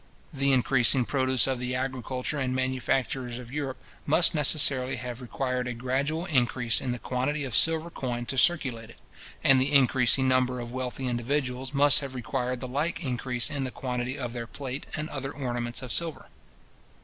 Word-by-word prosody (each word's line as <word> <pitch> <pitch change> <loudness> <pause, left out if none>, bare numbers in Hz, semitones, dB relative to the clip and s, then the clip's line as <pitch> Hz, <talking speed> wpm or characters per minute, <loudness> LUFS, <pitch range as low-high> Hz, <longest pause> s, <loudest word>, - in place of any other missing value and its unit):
The 140 -1 +1
increasing 130 0 +4
produce 130 -1 +2
of 130 -2 -1
the 125 0 -2
agriculture 130 +2 -3
and 130 -1 -1
manufactures 130 -1 -1
of 125 -1 -10
Europe 140 -2 -3 0.3
must 165 +5 +5
necessarily 135 -3 +3
have 125 0 -6
required 125 0 -2
a 125 - -4
gradual 140 +7 -1
increase 120 - +2
in 130 - -2
the 120 - -2
quantity 130 +5 -2
of 125 -6 -4
silver 165 +6 +3
coin 120 -4 -4
to 135 - -3
circulate 130 -7 +1
it; - - -15 0.5
and 135 -1 +6
the 135 +2 +1
increasing 130 -1 +4
number 130 -1 +2
of 120 -1 -6
wealthy 130 +1 -4
individuals 130 +1 -2
must 145 0 +5
have 135 -2 -7
required 125 0 -3
the 130 - -4
like 155 +6 -2
increase 125 0 -1
in 140 -2 -2
the 130 - -2
quantity 125 +1 -4
of 120 -3 -4
their 120 -1 -5
plate 135 +2 -6
and 150 0 -3
other 135 -1 -4
ornaments 120 -3 -4
of 125 - -6
silver. 165 -2 0
130 Hz, 175 wpm, -27 LUFS, 125-140 Hz, 0.5 s, and